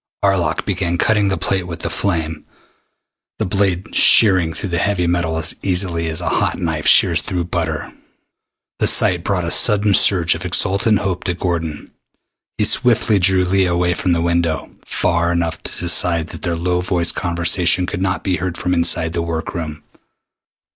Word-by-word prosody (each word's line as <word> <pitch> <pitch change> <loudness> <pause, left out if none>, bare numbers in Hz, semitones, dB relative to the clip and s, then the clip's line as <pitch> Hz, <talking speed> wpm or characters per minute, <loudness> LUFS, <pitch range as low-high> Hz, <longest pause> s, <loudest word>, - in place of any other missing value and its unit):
Arlok 95 -3 0
began 85 -2 -2
cutting 105 +1 +1
the 95 - -1
plate 95 +1 -2
with 85 -1 -7
the - - -3
flame, 80 -5 -2 0.9
the - - -2
blade 95 -1 -1
shearing 95 -6 +5
through 95 +4 -5
the 85 -1 -1
heavy 90 -1 0
metal 85 -1 -1
as 80 0 0
easily 90 -3 0
as 80 -1 -1
a - - -4
hot - - -1
knife - - -3
shears - - +5
through 90 -1 -3
butter. 85 - -4 0.9
The - - +2
sight 90 -1 +3
brought 90 -3 -1
a 85 - -3
sudden 105 0 +3
surge 90 -3 +4
of - - -7
exultant 100 +3 +2
hope 95 -3 -3
to 90 - -1
Gordon. 85 -4 -4 0.7
He - - +1
swiftly 115 -4 +2
drew 95 0 +2
Leah 95 -1 +1
away 90 0 +1
from 90 0 -1
the 85 0 -1
window, 85 -2 -1
far 85 0 0
enough 85 -2 -2
to - - -7
the 90 - -4
side 85 -2 +1
that - - -10
their 85 -1 -2
low 90 +1 -1
voiced 90 -2 -1
conversation 85 +1 +1
could 90 - -5
not 95 -3 -2
be 95 -2 -1
heard 90 -2 -4
from 90 - -2
inside 85 -1 +1
the 85 - -2
work 85 -1 -4
room. 80 -3 -6
90 Hz, 180 wpm, -18 LUFS, 85-95 Hz, 0.9 s, shearing